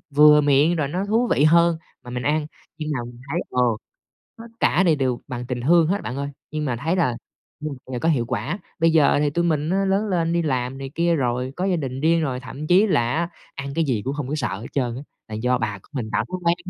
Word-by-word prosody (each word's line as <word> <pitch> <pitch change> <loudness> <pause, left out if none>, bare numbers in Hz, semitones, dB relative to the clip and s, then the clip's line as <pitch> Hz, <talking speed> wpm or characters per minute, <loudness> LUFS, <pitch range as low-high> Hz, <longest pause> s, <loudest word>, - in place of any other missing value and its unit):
vừa 150 0 +8
miệng 145 +4 +4
rồi 155 -4 0
nó 180 +7 -2
thú 230 +4 +2
vị 145 - +3
hơn 170 +1 +5 0.3
mà 125 - -10
mình 125 0 -4
ăn, 150 +2 +1 0.3
nhưng 155 -1 -4
mà 130 - -2
mình 120 0 -11
thấy, - - 0
ờ, 125 - +1 0.8
tất 225 - -9 0.2
cả 175 - +3
này 165 -4 +4
đều 130 -3 0
bằng 125 -1 -5
tình 125 -1 -3
thương 165 +5 +4
hết 195 +5 0
bạn 125 - -5
ơi, 140 0 -3 0.2
nhưng 155 0 -3
mà 125 -5 -1
thấy 160 +9 -1
là 150 -10 +1 0.4
ừm, 150 -2 -4 0.2
là 125 - -2
có 160 - 0
hiệu 130 -8 +2
quả. 160 - -2 0.2
Bây 165 0 +4
giờ 155 -3 +4
thì 145 -1 +2
tụi 170 +4 0
mình 155 -2 0
á 195 +1 +2
lớn 195 +2 +1
lên 170 -4 0
đi 170 0 +1
làm 130 -3 -1
này 135 -1 -6
kia 170 +1 +2
rồi, 125 -2 -1
có 180 - -1
gia 190 -2 +2
đình 135 -4 -4
riêng 165 +2 +3
rồi, 130 -4 -2
thậm 135 +4 -7
chí 185 +6 +5
là 120 - +1
á, 170 +1 0 0.3
ăn 140 0 -6
cái 165 +1 +1
gì 120 -8 0
cũng 135 +2 -2
hông 145 -3 -4
có 145 - -2
sợ 130 -7 -1
hết 115 - -7
trơn 125 -4 -1
á, 135 - -6 0.3
là 110 - -6
do 125 +4 +1
bà 105 -3 -2
của - - -24
mình 120 -6 -4
tạo - - +1
thói 185 - -4
quen. 170 +1 +3
150 Hz, 265 wpm, -23 LUFS, 125-170 Hz, 0.8 s, vừa